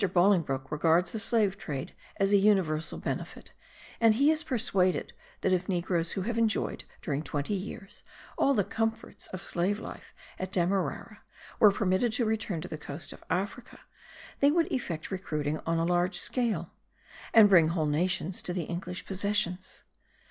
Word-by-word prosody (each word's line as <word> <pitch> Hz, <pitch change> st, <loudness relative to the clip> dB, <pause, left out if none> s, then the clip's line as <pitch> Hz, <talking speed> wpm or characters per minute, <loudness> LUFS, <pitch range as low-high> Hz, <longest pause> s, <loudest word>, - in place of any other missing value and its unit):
Bolingbroke 165 Hz, -8 st, +2 dB
regards 165 Hz, +4 st, +2 dB
the 225 Hz, -, -3 dB
slave 210 Hz, -3 st, +2 dB
trade 140 Hz, -10 st, -5 dB, 0.2 s
as 195 Hz, +1 st, +2 dB
a -, -, +8 dB
universal 185 Hz, -6 st, +2 dB
benefit; -, -, -5 dB, 0.5 s
and 225 Hz, -2 st, +5 dB
he 280 Hz, +6 st, +4 dB
is 315 Hz, -1 st, 0 dB
persuaded 195 Hz, -, 0 dB, 0.3 s
that 190 Hz, -, +2 dB
if 180 Hz, +1 st, -1 dB
negroes 175 Hz, -2 st, 0 dB
who 195 Hz, -, -2 dB
have 230 Hz, +3 st, -1 dB
enjoyed, 225 Hz, -1 st, 0 dB, 0.2 s
during 145 Hz, -3 st, -1 dB
twenty 145 Hz, +4 st, -3 dB
years, 195 Hz, +1 st, -6 dB, 0.3 s
all 275 Hz, -, +3 dB
the 205 Hz, -, +3 dB
comforts 225 Hz, +3 st, -3 dB
of 185 Hz, 0 st, -7 dB
slave 185 Hz, +4 st, 0 dB
life -, -, -9 dB, 0.3 s
at 185 Hz, 0 st, -4 dB
Demerara, 190 Hz, +3 st, -1 dB, 0.4 s
were 210 Hz, -, +8 dB
permitted 195 Hz, +3 st, +1 dB
to 240 Hz, 0 st, +1 dB
return 215 Hz, -6 st, -1 dB
to 180 Hz, -, -6 dB
the 155 Hz, -, -6 dB
coast 145 Hz, 0 st, -7 dB
of -, -, -15 dB
Africa, 200 Hz, +6 st, -3 dB, 0.6 s
they 280 Hz, -, +5 dB
would 330 Hz, +2 st, +1 dB
effect 175 Hz, -12 st, -3 dB
recruiting 155 Hz, -5 st, -2 dB
on 165 Hz, 0 st, +1 dB
a 165 Hz, -, +1 dB
large 175 Hz, +2 st, +1 dB
scale, 215 Hz, -10 st, -1 dB, 0.6 s
and 220 Hz, -2 st, +8 dB
bring 175 Hz, -5 st, +6 dB
whole 165 Hz, -1 st, 0 dB
nations 175 Hz, +4 st, 0 dB
to 175 Hz, -, -3 dB
the 175 Hz, -2 st, -2 dB
English 175 Hz, +2 st, -5 dB
possessions. 190 Hz, -2 st, -1 dB
185 Hz, 160 wpm, -29 LUFS, 170-215 Hz, 0.6 s, a